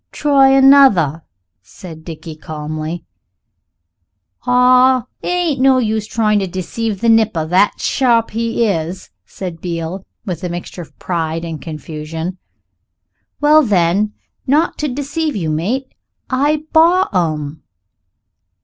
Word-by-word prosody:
"Try 275 -2 +3
another," 270 - +5 0.4
said 160 - -12
Dickie 165 -1 -9
calmly. 155 +2 -6 1.4
"Ah! 250 0 +4 0.2
it - - -6
ain't 345 -7 0
no 265 0 +5
use 220 -3 -1
trying 215 -2 +1
to 195 - -2
deceive 190 +3 -4
the 235 - +1
nipper 220 -8 +3
that 185 +5 +2
sharp 235 -4 +1
he 230 +1 -1
is," 175 -3 -3 0.2
said 175 -4 -7
Beale, 170 +1 -4 0.2
with 180 -5 -5
a 180 - -2
mixture 175 +1 -7
of 165 - -14
pride 165 -1 -3
and 160 -3 -6
confusion. 160 +3 -6 1.0
"Well, 300 +1 +6
then, 205 - +1 0.3
not 300 +5 +1
to 300 - -1
deceive 290 +3 -3
you, 165 -6 -2
mate, 225 +13 -2 0.4
I 290 +4 +1
bought 340 - +4
'em." 155 -4 -2
200 Hz, 120 wpm, -17 LUFS, 165-260 Hz, 1.4 s, Well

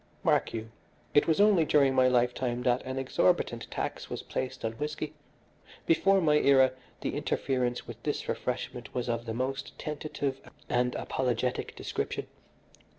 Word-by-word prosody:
"Mark - - +3
you, 115 0 -5 0.4
it 145 - +5
was 160 +1 +2
only 205 -5 +6
during 140 -3 +4
my 130 -1 +5
lifetime 125 0 +1
that 125 0 +2
an 130 +1 -4
exorbitant 135 -2 +1
tax - - -4
was - - -5
placed 130 -2 -4
on 110 - 0
whisky. 150 0 -3 0.7
Before 195 +4 +4
my 150 -4 +4
era 135 -3 +5 0.3
the - - -2
interference 125 -2 -1
with 120 -1 -9
this 145 +2 -2
refreshment 125 -1 -4
was 125 -1 -1
of 115 0 -2
the 110 - -2
most 135 +2 -3
tentative 145 -3 -3 0.3
and 125 0 +1
apologetic 125 -1 -1
description. - - -3
130 Hz, 150 wpm, -29 LUFS, 125-150 Hz, 0.7 s, only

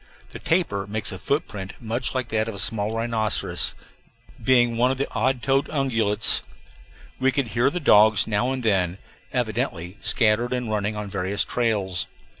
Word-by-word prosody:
The - - -8
tapir 135 - 0
makes 110 +1 -3
a - - -7
footprint 105 - -3
much 120 +3 -3
like 130 -2 -2
that 110 0 0
of 110 - -6
a - - -8
small 105 +2 0
rhinoceros, 115 -2 0 0.7
being 120 -3 +4
one 120 +2 +3
of 130 - -1
the 140 - -1
odd 130 +1 0
toed 135 0 +1
ungulates. 115 -7 +2 0.8
We 135 0 +3
could 135 0 0
hear 120 +6 +2
the 180 - -3
dogs 110 - +5
now 110 +4 0
and 130 -1 -3
then, 95 -5 +1 0.3
evidently 90 +5 -2
scattered 115 +2 +2
and 125 -3 -2
running 105 0 -1
on 105 -1 -4
various 100 +1 -1
trails. 105 -7 -1
110 Hz, 165 wpm, -24 LUFS, 105-130 Hz, 0.8 s, dogs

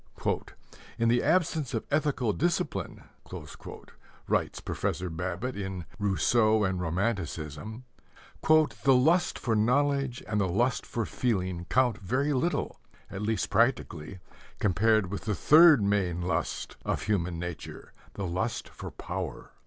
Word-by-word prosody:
"In 115 0 +2
the 120 +1 +3
absence 155 -5 +1
of 110 - -2
ethical 140 -7 +1
discipline," 170 - -2 1.2
writes - - 0
Professor 90 +1 -3
Babbitt 90 +9 -3
in 95 -4 -5
Rousseau 110 +3 +3
and 95 -2 0
Romanticism, 90 - -3 0.6
"the 155 -4 +4
lust 165 +8 +3
for 115 -3 -1
knowledge 135 +3 +1
and 105 -1 0
the 95 - +1
lust 120 +7 0
for 115 -2 -2
feeling 95 -9 -1
count 125 -4 +2
very 130 +8 0
little, 170 +7 -1 0.3
at 100 - -5
least 110 +1 -1
practically, 100 - 0 0.4
compared 105 0 +2
with 100 - -5
the 105 -2 0
third 155 - +7
main 100 -4 +1
lust 90 - -2
of - - -2
human 90 -5 -1
nature 85 -2 -7 0.2
the 100 - -3
lust 95 +7 -2
for - - -8
power. - - -6
110 Hz, 125 wpm, -28 LUFS, 95-130 Hz, 1.2 s, third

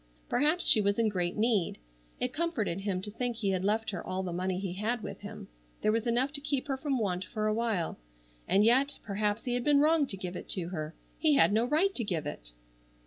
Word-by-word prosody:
Perhaps 300 +8 +2
she 215 - +7
was 200 0 +1
in 230 -1 +3
great 180 -3 -1
need. 215 -4 +1 0.4
It 250 0 -1
comforted 280 - -1
him 190 -2 -2
to 210 - -4
think 245 +2 -2
he 205 -4 0
had 185 -1 -1
left 215 +2 0
her 180 - -5
all 185 +1 -3
the 180 -2 -4
money 185 +1 -1
he 190 -2 -3
had 215 +4 -2
with - - -7
him. - - -8 0.4
There 215 - +4
was 225 +2 0
enough 250 +4 +1
to 285 - -1
keep 280 -1 -2
her 270 - +1
from 270 0 -1
want 190 -5 -1
for 215 +2 -3
a 215 - +2
while. 220 - -1 0.5
And 200 +2 +4
yet, 270 +5 +4
perhaps 210 +1 -1
he 245 - -2
had 245 0 0
been 290 +1 +4
wrong 305 0 +4
to 195 - -5
give 180 -1 -5
it - - -7
to 175 -2 -3
her. 155 -3 -5 0.2
He 310 -3 +4
had 210 - +5
no 225 +2 +3
right 320 +9 +2
to 240 - -2
give 170 -7 -2
it! - - -5
215 Hz, 240 wpm, -30 LUFS, 190-255 Hz, 0.5 s, she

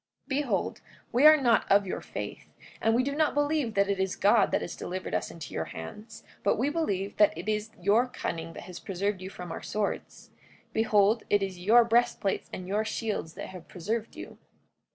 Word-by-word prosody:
44:9 - - -28
Behold, 285 +1 -1 0.3
we 255 +5 +6
are 310 0 +9
not 240 -6 +2
of 200 0 +5
your 185 - -4
faith; - - -7 0.4
we 240 +3 +3
do 280 +2 -1
not 305 0 +1
believe 290 -6 +1
that 200 0 +3
it 200 -1 -1
is 190 -1 0
God 205 0 +4
that - - 0
has 170 - -6
delivered 185 +1 -5
us - - -1
into 165 -3 -9
your 80 - -2
hands; 215 - -9 0.2
but 200 - +2
we 255 +6 +1
believe 200 - -2
that 210 -6 +4
it 175 +4 -7
is 215 0 -1
your 210 +7 +3
cunning 165 -9 -5
that - - -9
has 180 - -9
preserved 195 +1 -2
you 185 - -6
from 180 -3 -8
our - - -5
swords. 210 -1 -4 0.4
Behold, 220 0 +3
it 205 -1 +3
is 190 -2 -4
your 225 +6 +6
breastplates 230 -4 +1
and 180 - -6
your 205 +3 0
shields 215 -7 -3
that - - -6
have 185 -3 -10
preserved 215 +5 -4
you. - - -9
210 Hz, 200 wpm, -28 LUFS, 190-235 Hz, 0.4 s, are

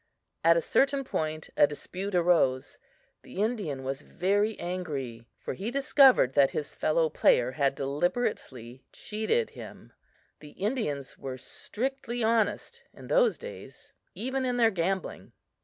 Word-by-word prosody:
At 165 +1 +6
a 165 - 0
certain 275 0 +2
point 155 - -3
a 145 - +6
dispute 185 +6 -5
arose. 165 -7 +2 0.4
The - - -14
Indian 200 - -1
was 135 +2 -4
very 205 +7 0
angry, 140 -10 -5
for - - -5
he 200 +4 -4
discovered 270 - +5
that 140 -1 +5
his 150 - -5
fellow 160 +1 +1
player 125 -4 +3
had 140 -1 0
deliberately 135 - -2
cheated 220 - -1
him. - - -11 0.5
The 150 -1 -13
Indians 195 - -3
were 130 -1 -6
strictly 245 - -4
honest 225 -1 0
in - - -12
those - - +3
days, 485 +1 -11 0.2
even 260 +2 -2
in 250 -1 -1
their 230 -2 +4
gambling. 190 +1 -3
180 Hz, 135 wpm, -28 LUFS, 140-240 Hz, 0.5 s, At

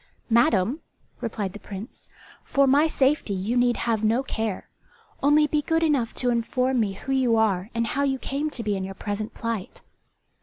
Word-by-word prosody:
"Madam," 235 - +3 0.4
replied 205 -4 -3
the 210 - -9
Prince, 205 +5 -10 0.3
"for 275 0 +2
my 285 +4 +4
safety 270 -8 +1
you 200 +6 -2
need 245 -1 +3
have 225 -2 -1
no 230 +5 +2
care. 220 -6 -3 0.5
Only 295 +2 +5
be 300 0 0
good 325 +2 +1
enough 280 -8 +1
to 250 -1 +1
inform 250 +2 0
me 205 -3 0
who 250 +7 -6
you 260 -3 +3
are 205 -3 +1
and 230 0 +1
how 275 +4 -1
you 275 -1 +1
came 280 +4 -2
to 245 -5 -6
be 205 -1 0
in 190 - -3
your 195 0 -6
present 205 +2 -4
plight." 230 -5 -4
235 Hz, 185 wpm, -25 LUFS, 210-270 Hz, 0.5 s, Only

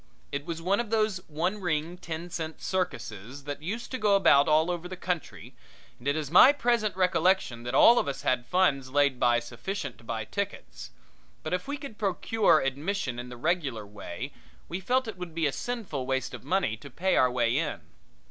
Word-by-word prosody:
It 140 +2 -4
was 165 -1 -4
one 195 +3 +2
of 235 -3 -2
those 215 -3 +1
one 175 +7 -2
ring, 165 -1 -1
ten 170 0 -6
cent 160 -2 -5
circuses 125 - -4
that 145 0 -5
used 205 +9 -5
to 255 - -3
go 210 -2 +4
about 145 -7 +5
over 165 +3 +2
the 185 0 -7
country, 180 -4 -4 0.5
and 120 - -8
it 140 - +2
is 155 -2 -3
my 220 +10 +9
present 235 -7 +1
recollection 180 -8 +2
that 125 +2 -2
all 235 - +8
of - - -1
us 140 - -4
had 120 -1 0
funds 145 -8 +2
laid 140 -2 +2
by 120 -1 +4
sufficient 125 - -5
to - - -16
buy 115 -1 -4
tickets; 60 - -5 0.5
but 155 - -3
if 180 +5 -2
we 285 +1 -3
could 275 -7 -9
procure 200 -2 +2
admission 135 -1 -2
in 125 0 -7
the 125 - -9
regular 140 - -1
way 105 +5 -7 0.3
we 175 - -4
felt 250 +6 +1
it 205 -5 -7
would 175 -3 -7
be 165 -2 +1
a 145 - +2
sinful 190 - -4
waste 130 0 -1
of - - -8
money 180 - 0
to 140 - -11
pay 185 +9 0
our 130 - +5
way 120 -1 +1
in. 150 0 -1
160 Hz, 200 wpm, -28 LUFS, 130-190 Hz, 0.5 s, my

